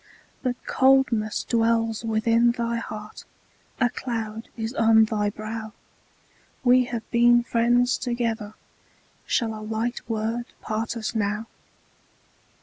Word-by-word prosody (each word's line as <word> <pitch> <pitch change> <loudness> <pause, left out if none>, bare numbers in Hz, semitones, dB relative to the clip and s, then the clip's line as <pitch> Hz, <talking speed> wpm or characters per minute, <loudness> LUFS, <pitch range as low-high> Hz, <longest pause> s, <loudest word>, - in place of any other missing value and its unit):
But 250 -2 -1
coldness 260 -5 +3
dwells 230 -1 +1
within 230 +1 +3
thy 235 -1 -2
heart, 215 -2 -7 0.6
A 245 - +4
cloud 225 -3 -5
is 225 +1 -3
on 225 -2 +5
thy 210 -1 0
brow; 215 +1 -6 0.9
We 250 0 +5
have 235 -2 -5
been 240 0 +5
friends 240 +1 +2
together, 230 -3 -2 0.7
Shall 225 -3 0
a 215 - -7
light 225 +3 -2
word 225 +2 -2
part 220 +2 -3
us 220 0 -3
now? 210 0 -1
230 Hz, 115 wpm, -25 LUFS, 220-240 Hz, 0.9 s, on